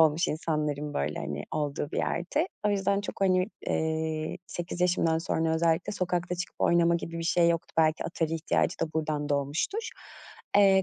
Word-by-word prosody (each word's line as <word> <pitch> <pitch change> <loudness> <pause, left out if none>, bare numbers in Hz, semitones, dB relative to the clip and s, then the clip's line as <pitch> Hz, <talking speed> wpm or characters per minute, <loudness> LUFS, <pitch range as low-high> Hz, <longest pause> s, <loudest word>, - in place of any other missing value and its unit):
olmuş 160 +1 +4
insanların, 150 -2 -2
böyle, 75 +2 -1
hani, 75 0 -4
olduğu 145 0 -2
bir - - -3
yerdi. 235 - 0 0.2
O - - +4
yüzden 200 0 +1
çok, 205 - -7
hani, 185 -1 +3 0.2
eee, 160 0 -1
8 175 0 -5
yaşımdan 175 -2 +3
sonra 160 -1 0
özellikle 165 +2 +1
sokakta 180 -2 -1
çıkıp 180 +1 -5
oynama 170 0 +4
gibi 165 0 -3
bir 165 - -3
şey 170 0 +4
yoktu. 165 -1 -1
Belki 155 -1 +3
Atari 165 -1 -1
ihtiyacı 165 0 0
da 160 -1 -1
buradan 155 -2 -1
doğmuştur. 145 - -1 0.7
Eee, 195 -1 +6
165 Hz, 165 wpm, -28 LUFS, 155-180 Hz, 0.7 s, Eee